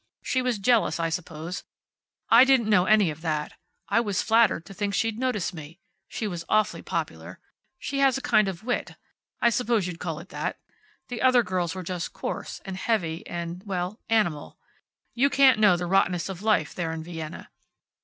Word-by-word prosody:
She 260 - 0
was 250 -3 0
jealous, 225 -2 +2
I 165 0 0
suppose. 165 +1 -5 0.7
I 230 +2 +9
didn't 260 -5 +3
know 180 -3 +5
any 210 -4 +4
of 150 +1 -10
that. 155 -2 -2 0.3
I 205 - +3
was 205 -5 0
flattered 225 -7 +3
to - - -11
think 200 0 -2
she'd 225 +1 0
notice 250 -8 -1
me. 160 0 -10 0.3
She 220 - -4
was 175 -4 -5
awfully 215 -6 +2
popular. 90 - -5 0.4
She 275 +1 -4
has 270 -2 +4
a - - -6
kind 215 -7 +3
of 190 0 -5
wit. 245 +1 -2 0.5
I 235 - +5
suppose 230 -4 +1
you'd 175 -2 -6
call 160 -3 -4
it 170 - -11
that. - - -3 0.5
The 240 -3 -5
other 255 -2 +5
girls 180 -3 -2
were 185 - -5
just 175 0 -4
coarse, - - -5
and 190 -1 -5
heavy, 180 -7 -1
and 170 +1 -5
well 185 +3 -3
animal. 195 -10 0 0.6
You 270 +4 +3
can't 270 -5 +5
know 205 -5 +5
the 175 - -3
rottenness 180 -1 +1
of 190 -1 -6
life 210 -8 +1
there 165 -2 -3
in 160 -1 -5
Vienna. 160 -2 -8
190 Hz, 185 wpm, -26 LUFS, 170-225 Hz, 0.7 s, I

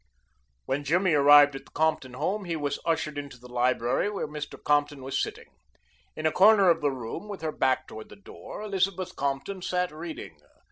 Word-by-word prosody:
When 140 +2 -2
Jimmy 175 +4 +2
arrived 145 0 +7
at 135 - -8
the - - -21
Compton 155 -5 0
home 200 +9 -2
he 170 -2 -2
was 145 -2 -2
ushered 155 -3 -1
into 140 -3 -8
the 125 0 -14
library 125 - +1
where 205 -6 -3
Mr. 150 0 -7
Compton 145 -2 +1
was 135 +1 -1
sitting. - - -6 0.6
In 155 - -5
a 155 - +3
corner 200 -1 +6
of 165 -1 0
the 145 - +2
room, 130 - -6
with 200 -4 -7
her 160 -1 -2
back 130 -3 0
toward 110 0 -10
the - - -12
door, 205 +1 -10
Elizabeth 190 -2 -1
Compton 140 +8 -3
sat 180 -1 -1
reading. 155 - -8
150 Hz, 190 wpm, -27 LUFS, 135-180 Hz, 0.6 s, arrived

